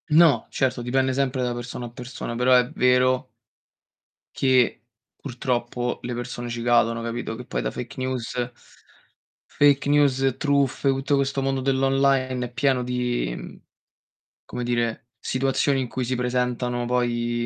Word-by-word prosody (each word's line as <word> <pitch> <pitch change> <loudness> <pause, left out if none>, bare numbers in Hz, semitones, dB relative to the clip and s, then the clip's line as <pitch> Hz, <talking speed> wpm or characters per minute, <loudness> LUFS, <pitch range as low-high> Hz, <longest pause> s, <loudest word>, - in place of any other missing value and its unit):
No, 155 -6 +5
certo, 130 -2 0
dipende 130 +2 +1
sempre 135 -1 0
da 125 -1 0
persona 120 0 -6
a - - -7
persona, 120 -1 -6
però 125 +2 +3
è 125 0 +4
vero 125 0 +2 1.1
che, 130 -4 +2 0.3
purtroppo, 125 -2 -2
le 125 - -3
persone 120 0 -5
ci 120 0 -4
cadono, 115 -1 +3
capito, 115 -1 -4
che 125 +2 -9
poi - - -3
da - - -1
fake 120 -1 -7
news 125 -1 -3 1.0
fake 145 -1 +3
news, 135 -3 +3
truffe, 140 -2 +1
tutto 135 +1 +1
questo 135 0 0
mondo 135 0 0
dell' 130 0 +1
online 135 -2 +2
è 120 - -13
pieno 130 0 +1
di, 125 - -1
mhmm, - - -9 0.9
come 125 - -5
dire, 120 -1 -1
situazioni 135 +2 +1
in 130 - -3
cui 130 +2 -3
si 130 +2 -1
presentano 125 0 -1
poi 120 -1 0
125 Hz, 150 wpm, -24 LUFS, 120-135 Hz, 1.1 s, No